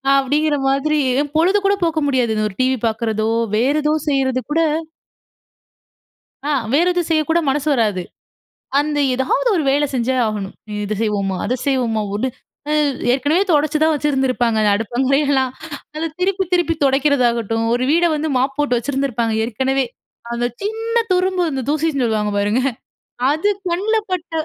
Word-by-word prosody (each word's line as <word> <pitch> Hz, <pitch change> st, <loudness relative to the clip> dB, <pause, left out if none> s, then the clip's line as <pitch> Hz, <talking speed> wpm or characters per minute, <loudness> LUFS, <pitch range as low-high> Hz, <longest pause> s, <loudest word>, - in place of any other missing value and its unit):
அப்டிங்குற 290 Hz, +3 st, +1 dB
மாதிரி, 295 Hz, +3 st, +1 dB, 0.4 s
பொழுது 370 Hz, +5 st, +4 dB
கூட 395 Hz, -, +4 dB
போக்க 325 Hz, -1 st, 0 dB
முடியாது, 250 Hz, -5 st, +1 dB
இந்த 215 Hz, 0 st, 0 dB
ஒரு 190 Hz, -, -13 dB
டிவி 260 Hz, 0 st, +2 dB
பாக்குறதோ, 220 Hz, -1 st, -1 dB, 0.3 s
வேற 260 Hz, +6 st, +2 dB
ஏதோ 300 Hz, +1 st, +2 dB, 0.2 s
செய்யுறது 265 Hz, -2 st, +1 dB
கூட 315 Hz, -, +2 dB, 1.9 s
ஆ, 295 Hz, -, -1 dB, 0.2 s
வேறு 335 Hz, +6 st, +3 dB
எதுவும் 350 Hz, -2 st, -1 dB
செய்யக்கூட 320 Hz, +2 st, +2 dB
மனசு 290 Hz, +2 st, -1 dB
வராது. 210 Hz, -6 st, +1 dB, 0.8 s
அந்த 295 Hz, 0 st, -1 dB
ஏதாவது 425 Hz, -, 0 dB
ஒரு 325 Hz, -, +1 dB
வேல 285 Hz, +2 st, +2 dB
செஞ்சே 250 Hz, +1 st, 0 dB
ஆகணும். 210 Hz, -3 st, -3 dB, 0.3 s
இத 210 Hz, +1 st, -2 dB
செய்வோமா 200 Hz, -3 st, -1 dB
அத 240 Hz, -, 0 dB
செய்வோமா 240 Hz, -5 st, +1 dB
ஓடு 215 Hz, +6 st, -1 dB, 0.4 s
அ -, -, +2 dB, 0.4 s
ஏற்கனவே 290 Hz, +8 st, +2 dB
தொடைச்சு 300 Hz, 0 st, +2 dB
தான் 320 Hz, -, +4 dB
வச்சுருந்துருப்பாங்க, 265 Hz, -5 st, 0 dB
அந்த 210 Hz, -, +3 dB
அடுப்பங்காறயெல்லாம், 265 Hz, +4 st, +1 dB, 0.4 s
அத 325 Hz, +1 st, -2 dB
திருப்பி 380 Hz, +1 st, +1 dB
திருப்பி 350 Hz, -2 st, +2 dB
தொடைக்குறதாகட்டும். 245 Hz, -5 st, +2 dB
ஒரு 245 Hz, +1 st, 0 dB
வீட 340 Hz, +2 st, +3 dB
வந்து 305 Hz, +1 st, -2 dB
மாப் 265 Hz, +1 st, 0 dB
போட்டு 290 Hz, -4 st, +1 dB
வச்சிருந்திருப்பாங்க 245 Hz, -3 st, -1 dB
ஏற்கனவே, 265 Hz, +3 st, 0 dB, 0.5 s
அந்த 240 Hz, 0 st, 0 dB, 0.2 s
சின்ன 450 Hz, +2 st, -3 dB, 0.2 s
துரும்பு 370 Hz, 0 st, +1 dB
வந்து 270 Hz, -4 st, -2 dB
தூசின்னு 300 Hz, -2 st, 0 dB
சொல்லுவாங்க 215 Hz, -3 st, 0 dB
பாருங்க 205 Hz, +5 st, +1 dB, 0.7 s
அது 320 Hz, +7 st, +1 dB, 0.2 s
கண்ல 390 Hz, +6 st, 0 dB, 0.2 s
பட்ட 355 Hz, -2 st, -3 dB
270 Hz, 145 wpm, -19 LUFS, 235-310 Hz, 1.9 s, பொழுது